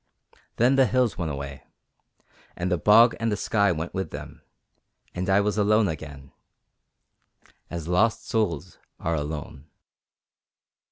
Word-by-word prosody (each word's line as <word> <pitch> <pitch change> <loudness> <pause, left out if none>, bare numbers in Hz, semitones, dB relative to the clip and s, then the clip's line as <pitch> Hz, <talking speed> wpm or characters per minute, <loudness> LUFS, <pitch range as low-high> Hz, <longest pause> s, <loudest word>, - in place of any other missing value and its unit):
Then 125 +4 +3
the 135 -1 +5
hills 125 0 +1
went 85 -3 -2
away, 70 -2 -6 0.9
and 90 +1 -3
the 90 - +2
bog 115 +7 +6
and 115 -1 0
the 105 - -1
sky 100 -1 +2
went 80 0 -4
with 95 0 -3
them, - - -9 0.7
and 90 +1 -3
I 95 +1 +4
was 105 +1 -1
alone 105 +1 +3
again, 70 -4 -7 1.4
as 85 -2 -6
lost 105 +6 +1
souls 105 -9 -2 0.2
are 85 - -1
alone. 75 -1 -5
90 Hz, 130 wpm, -25 LUFS, 80-110 Hz, 1.4 s, bog